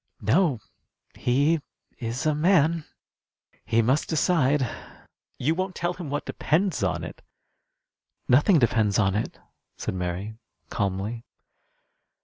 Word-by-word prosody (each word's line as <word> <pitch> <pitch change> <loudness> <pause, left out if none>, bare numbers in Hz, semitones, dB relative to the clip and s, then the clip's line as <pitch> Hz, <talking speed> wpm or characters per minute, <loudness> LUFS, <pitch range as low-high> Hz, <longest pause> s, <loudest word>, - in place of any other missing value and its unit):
"No. 140 - +3 0.5
He 145 +6 +2 0.4
is 120 +3 -3
a 155 - +3
man. 160 0 +3 0.8
He 115 0 +2
must 130 +6 +1
decide." 150 -5 +2 0.7
"You 150 +6 +1
won't 185 +2 -3
tell 175 0 -1
him 175 -5 -7
what 145 +1 -3
depends 170 - 0
on 95 -2 0
it!" - - -8 1.1
"Nothing 150 - +5
depends 110 -6 +2
on 95 -3 +2
it," 105 - -2 0.4
said - - -3
Mary, 95 +5 -4 0.3
calmly. 100 +4 -2
135 Hz, 115 wpm, -26 LUFS, 110-160 Hz, 1.1 s, Nothing